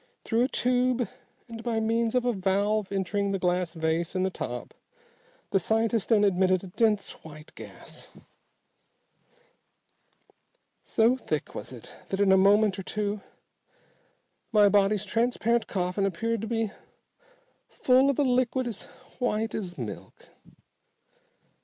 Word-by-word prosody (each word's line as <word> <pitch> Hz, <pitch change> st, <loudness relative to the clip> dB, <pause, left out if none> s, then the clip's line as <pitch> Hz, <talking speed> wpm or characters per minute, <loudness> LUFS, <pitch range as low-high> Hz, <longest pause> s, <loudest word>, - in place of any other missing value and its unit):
Through 235 Hz, +2 st, +2 dB
a -, -, 0 dB
tube, 250 Hz, -2 st, +1 dB, 0.4 s
and 230 Hz, -1 st, -8 dB
by 230 Hz, -1 st, -1 dB
means 225 Hz, +1 st, 0 dB
of 250 Hz, -1 st, +2 dB
a 245 Hz, -, +2 dB
valve 200 Hz, +1 st, 0 dB
entering 200 Hz, +1 st, -1 dB
the -, -, +1 dB
glass 180 Hz, -1 st, 0 dB
vase 160 Hz, +2 st, -1 dB
in 185 Hz, -, +1 dB
the 190 Hz, -, 0 dB
top, -, -, -6 dB, 0.8 s
the 195 Hz, -, +3 dB
scientist 225 Hz, +2 st, 0 dB
then 215 Hz, -3 st, +4 dB
admitted 185 Hz, -1 st, +3 dB
a -, -, -7 dB
dense 210 Hz, +1 st, +1 dB
white 155 Hz, -1 st, -12 dB
gas. -, -, -9 dB, 2.8 s
So 230 Hz, +3 st, +3 dB
thick -, -, -3 dB
was -, -, -6 dB
it -, -, -10 dB, 0.2 s
that 195 Hz, -, -2 dB
in 200 Hz, -1 st, +4 dB
a -, -, +7 dB
moment 200 Hz, +1 st, +4 dB
or -, -, -5 dB
two 210 Hz, +1 st, -2 dB, 1.3 s
my 210 Hz, -2 st, +6 dB
body's 205 Hz, 0 st, +3 dB
transparent 235 Hz, 0 st, +1 dB
coffin 185 Hz, +1 st, 0 dB
appeared 230 Hz, +4 st, -2 dB
to 225 Hz, -, -4 dB
be 225 Hz, -2 st, -1 dB, 1.0 s
full 260 Hz, +2 st, +3 dB
of 280 Hz, -, 0 dB
a 290 Hz, -, +3 dB
liquid 255 Hz, 0 st, +1 dB
as 230 Hz, -5 st, -5 dB, 0.3 s
white 225 Hz, -3 st, -1 dB
as 180 Hz, -4 st, -5 dB
milk. 115 Hz, -5 st, -8 dB
210 Hz, 135 wpm, -27 LUFS, 190-230 Hz, 2.8 s, a